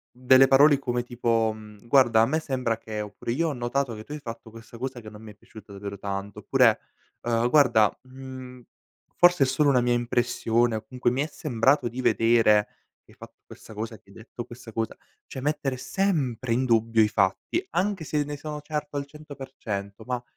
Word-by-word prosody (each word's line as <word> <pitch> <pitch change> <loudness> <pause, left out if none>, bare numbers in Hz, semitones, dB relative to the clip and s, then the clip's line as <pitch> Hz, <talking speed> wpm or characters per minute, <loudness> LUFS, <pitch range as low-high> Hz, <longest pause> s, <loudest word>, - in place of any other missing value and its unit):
Delle 130 +1 +6
parole 140 +1 +6
come 120 -2 -2
tipo, 115 -2 0
mhmm, 105 0 -14
"guarda 120 -4 +5
a - - +5
me 155 +7 0
sembra 130 -6 -2
che" 110 -1 -7
oppure 105 +3 -6
"io 165 +6 0
ho - - -3
notato 125 0 -2
che 110 0 -8
tu 145 - -15
hai 150 - -5
fatto 115 -4 -9
questa 115 +1 -13
cosa 130 -1 -4
che 110 - -10
non 105 0 -13
mi 110 -1 -10
è - - -17
piaciuta 110 -1 -15
davvero 100 0 -7
tanto" 100 0 -5
oppure, - - +3 0.4
"uhm, 120 0 +1
guarda, 120 -8 +4
mhmm, 130 -1 -10 0.5
forse 175 -5 +5
è - - +4
solo 140 +3 +2
una 125 -3 +4
mia 120 0 +1
impressione 120 -1 +1
o - - -5
comunque 120 +1 -1
mi 135 +3 -1
è 150 - -1
sembrato 135 -2 +1
di 125 +3 -5
vedere 115 -3 +4 0.4
che - - -22
hai - - -21
fatto - - -13
questa - - -13
cosa, 110 +1 -5
che 100 - -27
hai - - -16
detto 115 +1 -9
questa 120 -1 -12
cosa". 115 -1 -3 0.3
Cioè, 130 - -7
mettere 145 -2 -1
sempre 130 - -1
in 130 +2 +1
dubbio 115 -1 +3
i - - +3
fatti, 105 - 0
anche 190 -1 -1
se 150 -1 -1
ne 145 0 -6
sono 150 0 -7
certo 150 -1 -4
al 140 - -3
100% 130 -9 -7
ma 125 -1 -2
120 Hz, 205 wpm, -26 LUFS, 110-140 Hz, 0.5 s, Delle